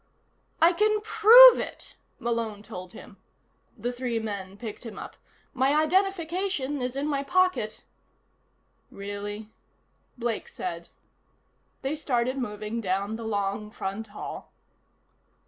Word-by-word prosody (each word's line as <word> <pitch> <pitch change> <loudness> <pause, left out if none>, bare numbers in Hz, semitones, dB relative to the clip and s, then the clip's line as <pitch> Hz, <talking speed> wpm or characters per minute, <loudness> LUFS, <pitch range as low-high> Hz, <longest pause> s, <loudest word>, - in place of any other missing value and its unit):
"I 335 +2 +6
can 425 +3 +2
prove 455 +3 +9
it!" - - -7 0.2
Malone 230 -3 -3
told 180 -3 -9
him. 195 - -13 0.6
The 240 +3 -2
three 245 -1 -2
men 200 -3 -5
picked 215 +1 -8
him 230 - -8
up. - - -8 0.4
"My 270 +3 +2
identification 340 -4 0
is 250 +1 -3
in 275 +1 -2
my 280 -2 0
pocket 365 -10 +1 0.6
" - - -43 0.2
"Really?" 205 +1 -6 0.7
Blake 235 -2 -2
said. 170 -1 -6 0.9
They 275 +3 -1
started 255 -3 -1
moving 215 -1 -4
down 200 +2 -1
the 230 0 -7
long 205 0 -2
front 205 +1 -5
hall. 205 - -8
235 Hz, 120 wpm, -27 LUFS, 205-305 Hz, 0.9 s, prove